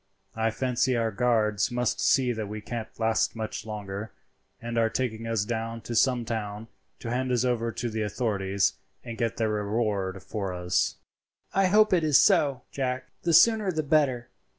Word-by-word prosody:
I 110 0 +1
fancy 125 +1 0
our 115 -1 0
guards 105 -2 +1
must 125 -1 -1
see 130 -2 +3
that 110 -2 -4
we 105 +1 -5
can't 115 +1 -5
last 110 0 +1
much 110 -1 -5
longer, 105 0 -6 0.5
and 115 0 -5
are 115 -1 +3
taking 115 -1 -3
us 115 -3 0
down 115 0 -3
to 120 - -6
some 120 +1 +2
town 110 -1 -4 0.3
to 115 - -4
hand 130 +1 -1
us 125 0 +2
over 115 -2 0
to 120 - -3
the 110 -1 -3
authorities 100 -3 0 0.3
and 115 -2 -6
get 115 -1 -2
their 110 -1 +1
reward 105 -3 -1
for 100 -4 -4
us." 90 0 0 0.6
"I 195 -1 +3
hope 210 +2 +4
it 175 -3 +3
is 150 -3 +5
so, 135 -4 +3
Jack; 130 -1 -3
the 170 - 0
sooner 215 +2 +5
the 155 -2 -1
better. 140 -5 +1
115 Hz, 175 wpm, -27 LUFS, 110-125 Hz, 0.6 s, is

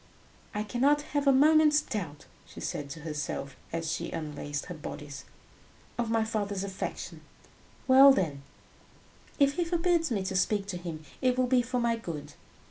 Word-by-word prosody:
"I 210 - 0
cannot 275 +7 +2
have 290 -1 +1
a - - +8
moment's 300 +2 +6
doubt," 180 - -5 0.2
she - - -11
said 145 -1 -4
to 155 +3 -8
herself, 150 -3 -4 0.2
as 165 -1 -2
she - - -3
unlaced 145 -2 -4
her 180 - -6
bodice, 145 -2 -8 0.7
"of 235 -2 -1
my 225 -1 +2
father's 205 -3 -2
affection. 195 -1 -5 0.7
Well, 270 +1 +9
then, 155 - 0 1.0
if 280 0 +3
he 350 - +2
forbids 340 -1 +1
me 200 -6 -1
to 190 0 -2
speak 200 +2 +1
to 180 - -3
him, 165 -3 -7 0.2
it 255 -1 +2
will 255 - +3
be 250 0 +3
for 250 +1 -2
my 235 -1 +1
good. 165 -9 -7
210 Hz, 165 wpm, -29 LUFS, 165-270 Hz, 1.0 s, Well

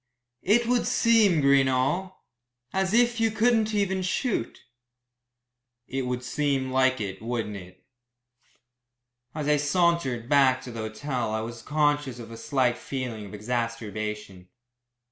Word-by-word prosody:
"It 225 +5 +3
would 245 +1 +1
seem, 215 -9 +4
Greenall, 140 +7 +2 0.6
as 190 0 0
if 235 +1 +3
you 225 0 +3
couldn't 220 0 +2
even 190 -2 0
shoot." 185 - -2 1.3
"It 135 -1 -3
would 125 0 -3
seem 135 -1 -1
like 130 0 +2
it, 95 -2 -5
wouldn't 115 -2 -3
it." 90 -1 -14 1.5
As 150 -2 -3
I 150 0 +4
sauntered 150 -6 +1
back 135 -2 +4
to 125 - -8
the 115 - -7
hotel 115 +2 -3
I 110 - -1
was 115 +1 -7
conscious 145 -4 0
of 115 -1 -10
a 115 - -8
slight 120 +1 0
feeling 120 -6 -5
of 105 - -9
exacerbation. 105 -4 -4
130 Hz, 130 wpm, -26 LUFS, 115-175 Hz, 1.5 s, seem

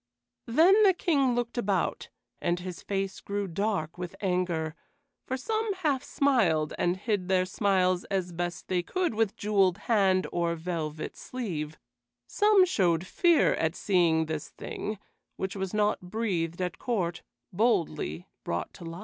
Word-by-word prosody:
Then 340 - +5
the 390 -4 +6
King 280 -9 +2
looked 240 0 -2
about, 195 -6 -1 0.3
and 175 0 0
his 180 0 -7
face 195 -1 -3
grew 200 0 -3
dark 185 -3 -2
with 180 +1 -5
anger, 180 -5 -1 0.5
for 260 - -1
some 440 - -1
half 295 -7 0
smiled 195 - +2
and 175 +1 +1
hid 200 -3 -1
their 185 -1 +3
smiles 185 -2 +1
as 185 -3 -2
best 175 +1 -4
they 180 -1 +1
could 360 - -1
with 220 -2 0
jeweled 195 -3 +2
hand 195 -4 +2
or 170 -1 0
velvet 160 -2 -4
sleeve; 160 -12 -5 0.5
some 410 - +4
showed 180 - +1
fear 340 - +3
at 160 +1 0
seeing 170 -5 +2
this 155 -1 -4
thing, 215 0 -5 0.4
which 190 +1 -3
was 190 -2 -3
not 210 0 +1
breathed 180 -3 -2
at 180 -2 -4
court, 180 -8 -1 0.3
boldly 175 - 0 0.2
brought 85 +1 -3
to - - -12
light. 165 +1 -7
190 Hz, 150 wpm, -28 LUFS, 175-225 Hz, 0.5 s, the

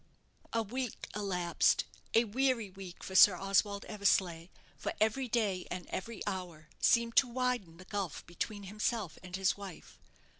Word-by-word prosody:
A 230 0 +1
week 245 +2 -4
elapsed 180 -4 +2 0.3
a 230 - +7
weary 235 -2 0
week 190 -2 -10
for 190 - -6
Sir 190 0 +9
Oswald 195 +2 +1
Eversleigh, 185 -5 +1 0.3
for - - -3
every 225 +5 +2
day 210 -6 0
and 180 - -4
every 210 +2 -4
hour 175 -5 -5
seemed 235 -1 +3
to 265 - +7
widen 245 -9 -1
the 185 - -12
gulf 195 -5 -4
between 200 +4 -4
himself 210 -1 -2
and 180 0 -7
his 190 0 +2
wife. 195 -4 -10
200 Hz, 150 wpm, -33 LUFS, 185-230 Hz, 0.3 s, Sir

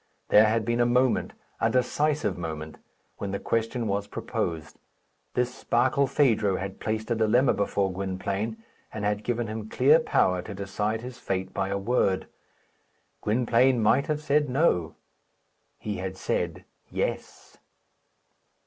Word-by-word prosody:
There 105 +1 +7
had 110 0 +1
been 120 +1 0
a 120 - +4
moment 125 +1 +2 0.3
a - - +2
decisive 145 -3 +1
moment 80 -2 -6 0.4
when 100 - -3
the 100 - -2
question 115 +1 -1
was 100 0 -1
proposed. 80 -3 -4 0.6
This 125 +1 -1
Barkilphedro 125 -5 +2
had 95 0 -5
placed 110 +1 -3
a - - +3
dilemma 115 +4 +3
before 100 -1 0
Gwynplaine, 100 +3 -3 0.3
and 105 -1 -4
had 105 0 0
given 120 -1 -1
him 110 0 -6
clear 145 +8 +5
power 90 - +2
to 100 +2 -8
decide 105 +3 -2
his 125 +1 -8
fate 95 0 -3
by 95 - -1
a 100 - -1
word. 100 -2 +1 1.0
Gwynplaine 120 +3 +3
might 115 +7 +3
have 155 -1 -2
said, 150 -1 +2
"No." 125 - +1 0.8
He 105 -1 -4
had 95 0 -5
said, 90 0 -2 0.2
"Yes." - - -4
110 Hz, 140 wpm, -27 LUFS, 95-125 Hz, 1.0 s, There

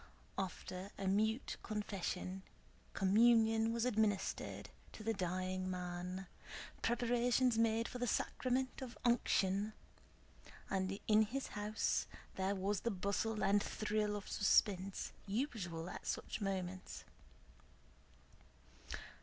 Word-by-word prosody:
After 185 0 -4
a 195 - -3
mute 220 +5 +1
confession, 195 -3 -3 0.5
communion 225 +2 +5
was 235 +1 0
administered 215 -5 0 0.2
to 215 - -8
the 225 +1 +1
dying 185 0 -1
man, 180 +1 -4 0.6
preparations 245 +1 +3
made 230 0 +3
for 250 - -6
the 245 - 0
sacrament 255 +3 0
of 250 -3 -6
unction, 210 -3 +2 1.0
and 190 0 0
in 215 0 +6
his 250 +6 -1
house 210 +1 0 0.3
there 190 +1 0
was 195 +1 0
the 235 - -1
bustle 205 +2 -1
and 205 +1 +4
thrill 210 0 0
of 205 - -6
suspense 195 -1 +2 0.2
usual 195 - -2
at - - -7
such - - -2
moments. 190 -2 -3
205 Hz, 105 wpm, -38 LUFS, 190-225 Hz, 1.0 s, in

